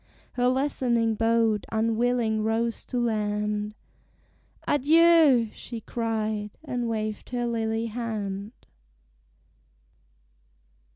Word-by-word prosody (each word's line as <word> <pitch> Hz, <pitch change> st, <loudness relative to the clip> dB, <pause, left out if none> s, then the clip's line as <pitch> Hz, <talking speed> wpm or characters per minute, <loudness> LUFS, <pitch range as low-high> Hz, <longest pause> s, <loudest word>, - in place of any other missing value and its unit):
Her 245 Hz, 0 st, +1 dB
lessening 250 Hz, -4 st, +1 dB
boat 225 Hz, -1 st, +1 dB
unwilling 225 Hz, 0 st, +1 dB
rows 225 Hz, +1 st, -1 dB
to 250 Hz, -, -2 dB
land; 210 Hz, -2 st, -1 dB, 0.9 s
"Adieu!" 295 Hz, -5 st, +5 dB
she 235 Hz, -2 st, -7 dB
cried; 220 Hz, -2 st, -2 dB
and 245 Hz, -5 st, -3 dB
waved 215 Hz, -1 st, -3 dB
her 245 Hz, -1 st, -2 dB
lily 225 Hz, -1 st, -1 dB
hand. 215 Hz, -3 st, -4 dB
230 Hz, 80 wpm, -26 LUFS, 215-245 Hz, 0.9 s, Adieu